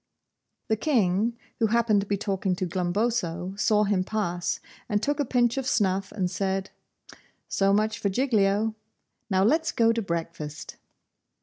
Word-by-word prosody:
The 220 - +1
King, 225 - +1 0.2
who 225 - +3
happened 220 -2 +3
to 200 - -6
be 200 - 0
talking 195 -2 -1
to 185 - -2
Glumboso, 180 0 -1
saw 210 +1 +3
him 200 -3 +1
pass, 185 -4 -2 0.3
and 210 -2 +2
took 290 +6 -1
a 290 - +2
pinch 240 0 +2
of 265 -1 -2
snuff 195 -3 +1
and 185 -4 -2
said, 190 +1 -2 0.8
'So 195 0 +2
much 215 +1 +1
for 200 - 0
Giglio. 215 -2 +2 0.6
Now 190 -1 +3
let's 315 +9 +2
go 230 -1 +3
to 230 - -1
breakfast. 165 -4 -5
205 Hz, 150 wpm, -26 LUFS, 185-225 Hz, 0.8 s, who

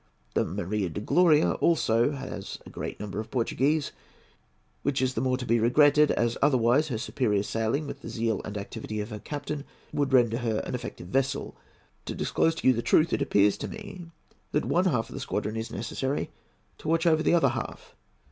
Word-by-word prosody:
The - - +2
Maria 100 0 -2
de 85 - -5
Gloria 155 +7 +4
also 145 -5 +3
has 130 -8 -6
a - - -11
great - - -6
number 105 -1 -5
of 110 0 -5
Portuguese, 140 +5 0 0.9
which 140 -1 0
is 130 0 +1
the 115 - -1
more 130 -1 +1
to 125 - -5
be 115 0 +2
regretted 145 +5 +5
as 120 0 0
otherwise 135 +1 +3
her 125 -7 -2
superior 110 -3 0
sailing, 115 +8 -1
with 140 0 -7
the - - -7
zeal 115 -3 -1
and 100 +1 -5
activity 105 +1 -5
of 105 +2 -4
her 105 - -5
captain, 145 +3 -5 0.3
would 140 -2 0
render 120 -3 +4
her 115 -3 -1
an - - -5
effective 85 - -6
vessel. 135 +4 -1 0.5
To - - -4
disclose 165 0 +1
to - - -1
you 130 - +7
the 115 - -1
truth, 160 +6 +3
it - - +1
appears 100 0 +3
to - - -4
me 195 -5 -8 0.5
that 150 - +1
one 180 +2 +2
half 125 -11 +1
of - - -11
the - - -5
squadron 105 +2 -2
is 110 +1 -3
necessary 130 +6 -3 0.5
to - - -8
watch 165 +2 +2
over 160 -2 +4
the 165 - +3
other 170 - +4
half. - - -6
130 Hz, 200 wpm, -27 LUFS, 110-150 Hz, 0.9 s, you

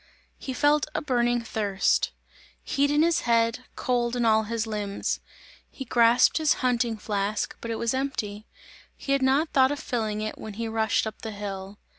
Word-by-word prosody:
He 265 - -5
felt 290 +2 +3
a - - 0
burning 240 -3 +1
thirst; 205 -4 +1 0.5
heat 285 0 +1
in 295 +2 +3
his 335 -1 +3
head, 230 +1 +1
cold 240 -1 0
in 240 -1 0
all 220 -1 +4
his 230 +1 -2
limbs; 210 -2 -2 0.5
he 265 - -8
grasped 235 0 +4
his 310 -2 +3
hunting 235 -2 +1
flask, 205 0 -2
but 230 - -6
it 230 - -1
was 235 +1 0
empty; 225 -6 -3 0.5
he 275 - -5
had 275 0 +3
not 275 +5 +2
thought 265 0 +4
of 290 - -2
filling 220 -7 -2
it 215 0 -4
when 215 -2 -7
he 230 +1 -3
rushed 220 0 +1
up 220 0 -6
the 220 - -5
hill. 200 -1 -6
230 Hz, 180 wpm, -26 LUFS, 215-260 Hz, 0.5 s, all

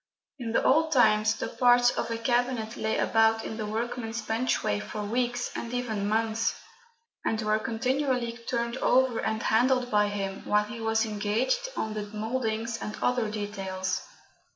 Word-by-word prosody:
In 235 -2 -3
the - - +2
old 315 +3 +3
times 220 -5 +4
the - - -3
parts 245 -1 +4
of - - -3
a 230 - -2
cabinet 240 -1 0
lay 220 0 -1
about 225 0 +3
in 220 - -5
the 215 -2 -3
workman's 225 +1 -3
benchway 220 - 0
for 210 - -5
weeks, 245 +3 -1
and 235 - -4
even 220 -5 -2
months, 225 +1 +1 0.7
and 220 - 0
were 215 0 +2
continually 250 +1 -1
turned 235 0 -1
over 260 -2 +3
and 220 0 -1
handled 250 +2 +2
by 210 -1 +4
him 195 -1 -4
while 210 0 +2
he 215 +2 -8
was 225 0 +1
engaged 220 - 0
on 220 - -2
the 210 -1 -4
mouldings 225 0 -2
and 210 - -5
other 245 -3 +1
details. 195 -3 -3
225 Hz, 160 wpm, -28 LUFS, 215-245 Hz, 0.7 s, times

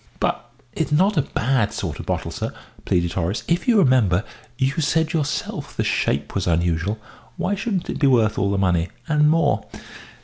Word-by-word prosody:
"But 120 - -1 0.2
it's 160 - -2
not 190 +7 +3
a 150 - +4
bad 130 -4 0
sort - - -4
of - - -8
bottle, - - -2
sir," - - -4 0.3
pleaded 85 -1 +1
Horace. 95 +4 -1
"If 175 +8 0
you 235 -3 +5
remember, 120 - +4 0.3
you 135 -1 +2
said 160 +2 +1
yourself 150 -3 -3
the - - +1
shape 70 +2 0
was 95 -2 -1
unusual. 85 +4 +1 0.4
Why 195 - 0
shouldn't 200 -2 -2
it - - -4
be 140 - +4
worth 115 -4 +3
all 100 - +1
the 100 - 0
money, 90 -2 +1 0.2
and 150 -1 +4
more?" 160 -2 +2
130 Hz, 180 wpm, -22 LUFS, -, 0.4 s, you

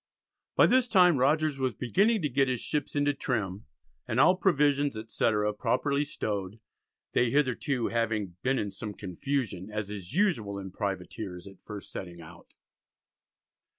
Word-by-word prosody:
By - - +7
this 255 -1 +4
time 180 - +5
Rogers 150 +1 +2
was 130 -2 0
beginning 200 - +2
to - - +2
get 135 +1 +2
his 125 -2 -1
ships 150 +4 -3
into 145 0 +2
trim 105 - -3 0.4
and 120 +1 0
all 180 +7 +6
provisions, 145 - +2
etc., 105 -1 0
properly 140 +6 0
stowed, 100 -4 -4 0.5
they 120 - +2
hitherto 130 -2 +1
"having 110 -5 -1
been 135 +1 +1
in 105 -4 -2
some 105 +1 -7
confusion, 100 0 -3
as 105 -1 -4
is 100 -2 -7
usual 160 - +1
in 95 -1 -7
Privateers 95 -1 -5
at 95 -1 -14
first 105 -1 -9
setting 85 -2 -7
out." 85 +2 -14
115 Hz, 150 wpm, -29 LUFS, 100-145 Hz, 0.5 s, By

